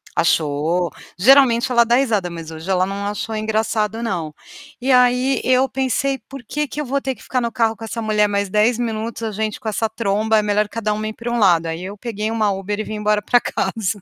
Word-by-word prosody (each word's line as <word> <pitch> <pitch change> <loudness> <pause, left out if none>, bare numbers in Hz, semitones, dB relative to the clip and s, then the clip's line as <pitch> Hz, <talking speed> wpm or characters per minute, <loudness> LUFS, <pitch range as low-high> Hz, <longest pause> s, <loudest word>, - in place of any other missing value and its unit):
Achou. 160 +2 +1 0.3
Geralmente 255 +3 +5
ela 235 -1 +5
dá 235 - +1
risada, 225 -8 +1
mas 165 -2 -7
hoje 160 +1 -9
ela 185 -1 +2
não 200 +1 -4
achou 210 +2 -3
engraçado, 215 0 -1
não. 175 -9 -3 0.5
E 265 +2 +1
aí 250 +1 +4
eu 255 +1 +3
pensei: 270 +1 0
"Por 275 -2 -9
que 295 +6 -2
que 295 - -5
eu - - -4
vou 275 +2 0
ter 270 -1 -3
que - - -19
ficar 255 - -1
no 235 -1 -2
carro 225 -1 +1
com 225 - -11
essa 230 +1 -4
mulher 210 -1 +2
mais 200 -1 -1
10 215 +4 +2
minutos, 230 -1 -3
a 225 -1 -2
gente 215 +1 -3
com 220 - -3
essa 220 +1 0
tromba, 220 0 +1
é - - +2
melhor 210 0 +1
cada 215 0 -2
uma 215 +1 -3
ir 215 - -4
para 235 +2 -5
um 240 - 0
lado". 170 -5 +4
Aí 165 +2 -4
eu 200 +2 -6
peguei 215 -1 -3
uma 215 -2 +1
Uber 195 +2 -3
e - - -1
vim 215 - -6
embora 210 0 +1
para 245 +4 +3
casa. 210 -3 -2
220 Hz, 235 wpm, -20 LUFS, 200-235 Hz, 0.5 s, Geralmente